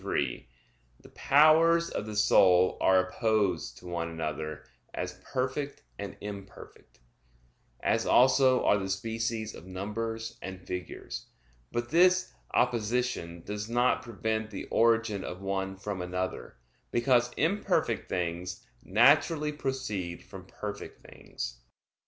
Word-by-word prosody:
3: 65 -4 -2 0.5
The - - -15
powers 165 +3 +5
of 105 - -4
the 105 - -5
soul 95 -3 +5
are 95 -1 +4
opposed 95 - 0
to - - -14
one 85 -1 -3
another, 75 -1 -4 0.3
as 90 0 -5
perfect 135 +2 -3 0.2
and 100 0 -6
imperfect; 100 -1 -10 0.8
as - - +1
also 130 0 +5
are 105 - +4
the 95 0 -4
species 110 +2 -2
of 90 - -12
numbers 110 +4 -4
and 95 -1 -6
figures. 90 0 -6 0.4
But 120 0 -2
this 185 +2 +4 0.2
opposition 120 -7 0
does 105 +1 -5
not 120 +1 +2
prevent 110 -1 -3
the 100 - -6
origin 115 -3 +2
of 90 - -6
one 95 0 -2
from 100 -1 -4
another, 90 -7 -4 0.3
because 120 0 +3
imperfect 180 +8 0
things 90 +1 -3 0.2
naturally 145 - +4
proceed 120 -12 -4
from - - -11
perfect - - -7
things. - - -7
105 Hz, 120 wpm, -29 LUFS, 90-125 Hz, 0.8 s, powers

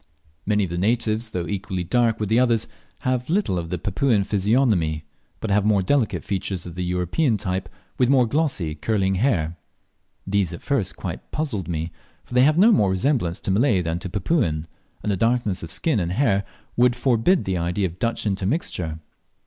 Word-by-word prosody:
Many 105 -1 +2
of 90 - -3
the 85 - -2
natives, 110 +2 0
though 90 -5 -3
equally 95 -1 -3
dark 115 +5 +1
with 105 - -1
the 110 +4 +3
others, 120 -3 +2 0.4
have 130 0 -1
little 175 - +1
of 85 -1 -5
the 90 - -2
Papuan 105 - +1
physiognomy, 100 - +1 0.4
but 110 - -3
have 100 0 +3
more 105 -2 +3
delicate 105 - +1
features 95 -2 -3
of 85 - -7
the 90 +1 -3
European 90 - +1
type, 95 -3 -3 0.3
with 125 -1 +4
more 130 -3 +5
glossy, 125 - 0
curling 95 +4 0
hair: 90 - 0 0.7
These 95 -3 0
at 85 - -9
first 135 -9 0
quite - - -6
puzzled 125 - -2
me, 80 0 -3 0.3
for - - -11
they 125 - +5
have 150 +4 +4
no 210 +6 +7
more 105 - +4
resemblance 95 - 0
to - - -1
Malay 105 -2 +3
than 80 +1 -2
to 95 0 -6
Papuan, 85 - 0 0.4
and 105 - 0
the 95 - 0
darkness 115 -3 +1
of 85 - -7
skin 140 - 0
and 85 -1 -1
hair 100 -5 +2 0.3
would 125 0 +4
forbid 125 +8 +2
the 95 -1 -1
idea 90 +4 0
of 90 0 -5
Dutch 115 -1 -1
intermixture. 95 - -2
100 Hz, 190 wpm, -23 LUFS, 90-120 Hz, 0.7 s, no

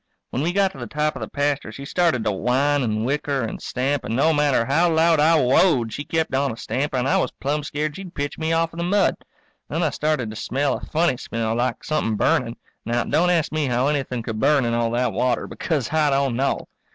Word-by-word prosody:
When 130 - -2
we 165 +4 0
got 195 0 +2
to 135 - -12
the 120 - -5
top 150 +4 -1
of - - -6
the - - -4
pasture 145 0 -1
she 140 - -8
started 165 -6 +1
to 105 - +1
whine 130 +8 +1
and 110 -2 -1
whicker 140 0 -1
and 115 - -5
stamp, 135 +2 -1
and 110 - -3
no 155 +5 +3
matter 145 -5 +2
how 165 +7 +3
loud 160 0 +3
I 160 +2 +5
whoa 135 +1 +4
ed 110 -1 -7
she 145 - -4
kept 160 -1 -1
on 135 0 +1
a 115 - -8
stamping 135 +2 -2
and 125 - -1
I - - +3
was - - +1
plumb 145 +2 -2
scared 150 +1 -3
she'd 190 -3 -9
pitch 145 0 -3
me 160 0 -1
off 165 0 +1
in 170 - -8
the - - -1
mud. 195 +2 +2 0.6
Then 165 +3 -1
I 155 - +1
started 150 -8 -1
to - - -9
smell 135 +5 -1
a - - -9
funny 160 -4 +1
smell, 115 -2 -3
like 120 +2 -1
somethin' 150 -8 -1
burning. 115 +3 +1 0.3
Now, 120 +1 0
don't 175 +2 +2
ask 170 -4 +1
me 155 -2 0
how 125 +2 +1
anything 130 -5 -2
could 110 -1 -4
burn 140 +3 +3
in 115 - 0
all 115 0 +1
that 120 -1 0
water, 125 +4 0
because 155 -4 -3
I 155 -2 +3
don't 135 -3 +1
know. 135 +3 -1
140 Hz, 245 wpm, -22 LUFS, 125-155 Hz, 0.6 s, I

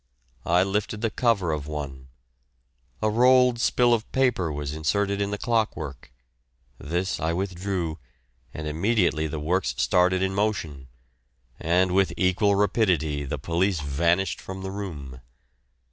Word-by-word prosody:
I 90 +2 +4
lifted 105 +2 -2
the 115 -2 0
cover 110 -10 +1
of 75 -2 -3
one; 70 -4 -6 1.0
a 110 - +3
rolled 125 +1 +4
spill 120 0 +3
of 115 -1 -2
paper 125 -11 +1
was 75 0 -4
inserted 100 +6 0
in 100 - 0
the 105 - -3
clock 115 -1 0
work; 70 -5 -8 0.7
this 90 +6 -2
I 80 +1 0
withdrew, 90 -3 -3 0.5
and 75 +3 -6
immediately 85 -1 +1
the 80 0 -5
works 90 +5 0
started 90 +1 +2
in 95 0 0
motion, 95 -10 -2 0.7
and 90 +3 +2
with 95 +1 +2
equal 100 +2 +2
rapidity 90 -8 +1
the 70 +2 -3
police 85 +5 0
vanished 85 +5 0
from 95 0 -7
the 95 - -4
room. 75 -11 -7
90 Hz, 140 wpm, -25 LUFS, 80-100 Hz, 1.0 s, I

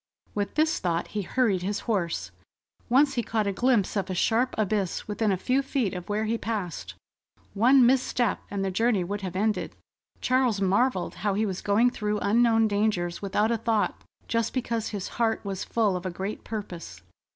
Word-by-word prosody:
With 205 -1 -2
this 310 +1 +2
thought, 170 -2 -1
he 210 - -2
hurried 200 -1 +1
his 200 +3 -2
horse. 190 -7 -2 0.6
Once 275 +3 +4
he 240 - 0
caught 220 -1 -1
a 200 - +1
glimpse 235 -3 +2
of 195 -2 -1
a 185 - -2
sharp 235 +7 +1
abyss 205 -3 -1
within 210 0 0
a 190 - +1
few 255 +8 +1
feet 265 -7 -1
of 180 0 -7
where 210 +1 0
he 225 +1 -1
passed. 205 -8 -4 0.6
One 245 +5 +5
misstep 250 -3 +2
and 195 -1 -2
the 190 - -1
journey 220 0 +2
would 200 +3 -4
have 185 -2 -5
ended. 210 +2 -1 0.4
Charles 255 -5 +2
marvelled 200 +1 +1
how 200 -1 +1
he 215 +2 +1
was 190 -3 -3
going 225 +5 +3
through 210 -3 -2
unknown 225 +2 +3
dangers 205 -4 0
without 205 +3 +1
a 230 - +1
thought, 225 -2 0 0.2
just 230 +1 -1
because 230 -3 -1
his 200 -3 -4
heart 225 -2 -1
was 195 -2 -3
full 215 -5 +1
of 180 +1 -3
a - - -1
great 190 +4 -5
purpose. 170 - -7
210 Hz, 185 wpm, -27 LUFS, 195-230 Hz, 0.6 s, One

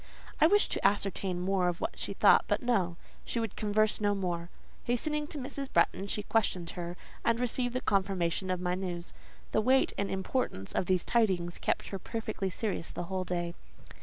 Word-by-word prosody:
I 315 - +7
wished 410 +4 +3
to - - -2
ascertain 195 -2 +1
more 185 0 +1
of 175 -1 -1
what - - -3
she - - -3
thought - - +6
but - - 0
no: 195 -8 +1 0.3
she 235 - -2
would 225 -3 -3
converse 215 0 +1
no 205 -1 +2
more. 175 -3 -2 0.4
Hastening 295 +5 +1
to 300 - -5
Mrs. 275 0 -4
Bretton, 195 - +2
she 210 +1 -2
questioned 185 -6 0
her, 175 0 -5 0.3
and 230 0 +2
received 245 0 -1
the 255 - 0
confirmation 190 -2 0
of 185 -1 0
my 180 0 0
news. 180 -2 -4 0.4
The 215 - +3
weight 260 +4 +3
and 200 - 0
importance 190 - -2
of 180 - 0
these 185 -2 +2
tidings 185 -7 +1
kept - - -1
her 195 - -4
perfectly 215 -1 -3
serious 190 -2 -3
the - - -4
whole 185 -1 -1
day. 175 -1 -2
195 Hz, 190 wpm, -31 LUFS, 180-230 Hz, 0.4 s, I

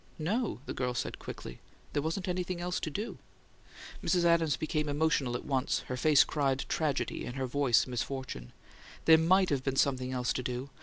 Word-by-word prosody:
"No," 195 - -1
the - - -4
girl 125 -1 -2
said, - - -3
quickly. - - -8 0.3
"There 145 - +1
wasn't 165 +6 -2
anything 180 0 -2
else 180 +1 -2
to - - -3
do." 210 +10 -5 0.8
Mrs. 180 -2 +2
Adams 165 -3 +3
became 155 -1 -1
emotional 145 -4 +1
at - - -5
once: 130 -2 0
her 125 - -5
face 145 +2 +5
cried 135 -3 0
tragedy, 150 -4 -1
and 120 - -6
her 135 -1 -1
voice 130 -2 +3
misfortune. 125 - -4 0.5
"There 160 -1 +8
MIGHT 185 +2 +4
have 135 -2 0
been 135 -1 -1
something 130 -2 +1
else 125 -1 0
to - - -2
do! 125 +2 -4
145 Hz, 185 wpm, -31 LUFS, 130-165 Hz, 0.8 s, There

